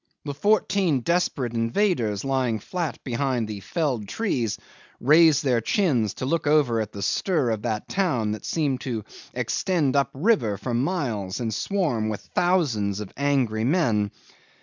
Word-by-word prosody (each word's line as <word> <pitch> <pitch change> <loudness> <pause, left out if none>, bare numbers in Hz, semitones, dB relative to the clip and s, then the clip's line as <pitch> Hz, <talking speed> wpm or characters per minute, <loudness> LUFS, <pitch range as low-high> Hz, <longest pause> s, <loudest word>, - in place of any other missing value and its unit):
The 145 - -3
fourteen 190 - +2
desperate 140 -6 0
invaders 115 - 0
lying 130 -4 +1
flat 170 - -4
behind 125 -2 -1
the 105 -2 -5
felled 130 - -2
trees 120 - -1 0.4
raised 155 +2 +5
their 125 -4 +2
chins 125 - +1
to - - -4
look 155 +2 0
over 140 -7 +3
at 110 -1 -5
the 100 -1 -6
stir 150 - +1
of 110 -2 -2
that 110 -2 -3
town 150 - 0
that 105 - -5
seemed 145 -6 -1
to 115 -5 -3 0.3
extend 145 - 0
up 140 -2 +3
river 135 - +2
for 125 - -4
miles 120 - -1
and 115 -2 -2
swarm 125 - 0
with 105 - -4
thousands 125 - +1
of 105 -3 -7
angry 130 -6 +1
men. 115 - +2
130 Hz, 150 wpm, -25 LUFS, 110-160 Hz, 0.4 s, raised